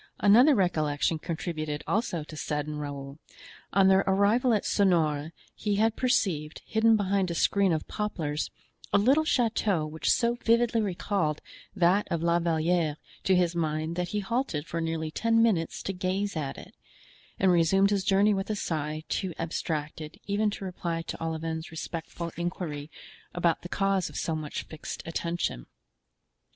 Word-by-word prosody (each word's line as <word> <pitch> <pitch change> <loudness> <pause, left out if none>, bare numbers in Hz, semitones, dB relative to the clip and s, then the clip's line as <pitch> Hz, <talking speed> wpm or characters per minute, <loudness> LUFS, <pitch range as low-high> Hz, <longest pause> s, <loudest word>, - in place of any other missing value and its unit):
Another 245 +8 +6
recollection 155 -4 +1
contributed 155 -3 -4
also 195 -7 -1
to 155 - -10
sadden 150 0 -3
Raoul: 140 0 -6 0.5
on 195 0 +5
their 190 +1 +5
arrival 205 +6 +3
at 215 -3 +2
Sonores 160 -6 +2 0.2
he 210 -2 -1
had 220 +2 +2
perceived, 175 - 0
hidden 225 0 +4
behind 195 -2 +1
a 170 - -3
screen 195 +2 +3
of 160 -1 -1
poplars, 160 -8 -2 0.4
a - - +5
little 270 +10 +4
chateau 220 - +1
which 155 +1 -2
so 235 -1 +3
vividly 230 0 +3
recalled 185 -5 -1 0.4
that 185 +2 +3
of 170 -1 -1
La 170 0 +3
Valliere 165 -2 +1 0.3
to 190 - +3
his 175 -1 +2
mind 155 0 -1
that 180 0 -1
he 210 +4 -2
halted 205 - -2
for 165 0 -3
nearly 160 -1 -2
ten 230 +6 +2
minutes 180 -8 0
to 195 - -2
gaze 190 +2 -2
at 145 -4 -3
it, - - -12 0.6
and 190 -1 +4
resumed 195 +4 +4
his 200 -2 +1
journey 200 +2 +4
with 195 +1 -2
a 215 - 0
sigh 155 -4 -3
too 185 -4 -2
abstracted 155 -1 -4
even 210 +1 +1
to 200 -1 -6
reply 170 -2 -3
to 165 - -6
Olivain's 160 0 -3
respectful 165 +1 -5
inquiry 165 -4 -4 0.5
about 175 -2 +1
the 175 - -8
cause 195 -1 +1
of - - -13
so 165 - -1
much 155 -2 -4
fixed 155 - -7
attention. 165 - -3
175 Hz, 160 wpm, -28 LUFS, 155-200 Hz, 0.6 s, Another